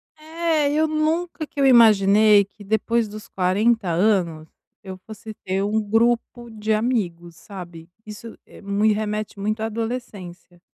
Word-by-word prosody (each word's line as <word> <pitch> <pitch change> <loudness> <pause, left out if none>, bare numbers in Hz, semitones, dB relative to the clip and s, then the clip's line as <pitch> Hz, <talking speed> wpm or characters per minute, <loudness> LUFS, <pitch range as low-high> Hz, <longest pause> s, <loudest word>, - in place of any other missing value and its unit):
É, 315 -2 -1
eu 310 +1 +1
nunca 310 +2 -2
que 290 - -10
imaginei 215 -5 +5
que, 205 +1 -17
depois 220 +2 0
dos 215 +1 -10
40 200 +4 0
anos, 170 -4 0 0.4
eu 190 -1 -8
fosse 220 0 -10
ter 190 +1 -1
um 215 +2 0
grupo 235 +2 0
de 220 0 -2
amigos, 185 -8 -2
sabe? 170 -2 -11 0.2
Isso 215 +2 -10 0.3
me 205 +2 +1
remete 215 -1 -4
muito 215 +2 -2
à - - -1
adolescência. 215 -6 -7
215 Hz, 135 wpm, -22 LUFS, 195-235 Hz, 0.4 s, imaginei